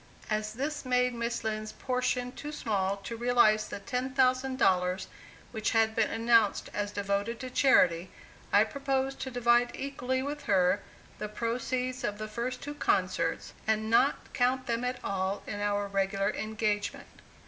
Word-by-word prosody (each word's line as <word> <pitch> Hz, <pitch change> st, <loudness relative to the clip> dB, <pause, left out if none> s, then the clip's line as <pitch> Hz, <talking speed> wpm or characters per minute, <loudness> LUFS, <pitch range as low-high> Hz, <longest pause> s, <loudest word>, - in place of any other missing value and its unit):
As 215 Hz, 0 st, -1 dB
this 290 Hz, +5 st, -3 dB
made 250 Hz, -1 st, +2 dB
Miss 235 Hz, 0 st, -2 dB
Lind's 215 Hz, -1 st, -3 dB
portion 250 Hz, -1 st, -1 dB
too 295 Hz, +3 st, -7 dB
small 200 Hz, -8 st, -1 dB
to 200 Hz, +4 st, -6 dB
realize 230 Hz, -3 st, +3 dB
the -, -, -6 dB
$10,000 255 Hz, -6 st, +1 dB, 0.5 s
which 220 Hz, -2 st, -1 dB
had 220 Hz, 0 st, +3 dB
been 225 Hz, -, +2 dB
announced 225 Hz, -2 st, +2 dB
as 205 Hz, 0 st, -2 dB
devoted 200 Hz, +3 st, -1 dB
to 255 Hz, -1 st, -6 dB
charity, 180 Hz, -11 st, +4 dB, 0.4 s
I 205 Hz, -, +6 dB
proposed 270 Hz, +2 st, -2 dB
to 265 Hz, -, -3 dB
divide 240 Hz, -1 st, +3 dB
equally 260 Hz, -1 st, -2 dB
with 290 Hz, +2 st, -5 dB
her 195 Hz, -3 st, +3 dB, 0.4 s
the 210 Hz, -, -4 dB
proceeds 250 Hz, +3 st, -2 dB
of 205 Hz, -, -2 dB
the 215 Hz, 0 st, -5 dB
first 240 Hz, +3 st, -4 dB
two 290 Hz, -, -5 dB
concerts, 295 Hz, -, 0 dB
and 220 Hz, 0 st, +1 dB
not 265 Hz, +4 st, +2 dB
count 255 Hz, +1 st, +1 dB
them 235 Hz, +1 st, -1 dB
at 250 Hz, 0 st, -1 dB
all 195 Hz, 0 st, -2 dB
in 205 Hz, -, -5 dB
our 205 Hz, 0 st, 0 dB
regular 195 Hz, +1 st, 0 dB
engagement. 215 Hz, -2 st, -3 dB
230 Hz, 150 wpm, -30 LUFS, 205-255 Hz, 0.5 s, I